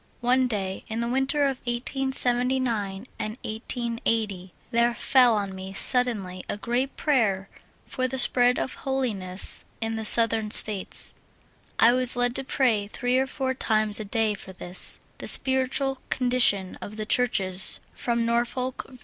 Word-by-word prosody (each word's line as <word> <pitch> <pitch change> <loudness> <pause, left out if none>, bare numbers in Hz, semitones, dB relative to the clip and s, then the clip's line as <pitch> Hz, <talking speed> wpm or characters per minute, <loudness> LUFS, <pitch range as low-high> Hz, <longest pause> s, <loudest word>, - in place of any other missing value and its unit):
One 255 +1 +2
day, 195 -5 -4
in 220 +1 -4
the 235 - -2
winter 270 +4 0
of 270 -2 0
1879 245 -4 -1
and 215 +2 -4
1880, 220 -4 -3 0.2
there 235 0 +2
fell 250 -3 +4
on 200 -2 -3
me 190 0 -8
suddenly 205 -6 +1
a - - -3
great 245 +5 -2
prayer 215 -10 0 0.4
for 255 -1 -2
the 265 +1 -5
spread 245 0 +3
of 260 - -3
holi 265 -3 -2
ness 185 -1 -4 0.2
in 225 0 -3
the 220 - -4
Southern 225 -1 +4
States. 210 -2 +1 0.6
I 230 - +6
was 255 0 +2
led 245 0 0
to 270 - -4
pray 235 -6 0
three 245 +4 -1
or 265 - 0
four 265 -1 -3
times 215 -4 +2
a - - -4
day 215 +1 0
for 190 -2 -10
this; 180 0 +3 0.2
the - - -5
spiritual 265 0 +3
condition 245 -7 +1
of 210 - -8
the 215 - -4
Churches 195 -6 +1
from 235 -1 -1
Norfolk, 240 +2 -2
Va. 260 - -14
235 Hz, 155 wpm, -25 LUFS, 210-255 Hz, 0.6 s, I